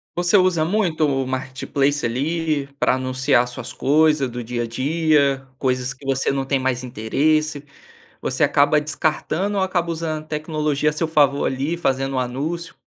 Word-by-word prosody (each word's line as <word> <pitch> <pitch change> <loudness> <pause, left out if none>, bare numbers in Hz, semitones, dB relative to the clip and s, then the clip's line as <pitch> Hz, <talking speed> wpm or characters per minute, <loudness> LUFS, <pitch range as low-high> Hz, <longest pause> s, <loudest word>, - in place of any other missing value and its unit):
Você 175 +3 +3
usa 185 -4 +3
muito 170 -4 +1
o 135 -1 0
Marketplace 130 +2 -1
ali 150 +4 -1
pra - - +3
anunciar 130 -1 +1
suas 125 0 -7
coisa 150 -1 +3
do 120 0 -6
dia 120 +1 -3
a 115 - -2
dia, 140 +1 +1
coisas 130 -1 -1
que 135 0 -12
você 135 -1 0
não 135 -1 -2
tem 135 0 0
mais 130 -1 -1
interesse, 145 +6 0 0.6
você - - -2
acaba 145 +1 +4
descartando 155 +6 -1
ou 190 - +2
acaba 180 -2 0
usando 160 -1 -3
a - - -23
tecnologia 150 -1 -1
a - - -6
seu 160 +2 -1
favor 145 -3 +3
ali 140 +6 -1
fazendo 135 -4 -1
um - - +1
anúncio? 150 +7 -3
145 Hz, 170 wpm, -21 LUFS, 130-155 Hz, 0.6 s, acaba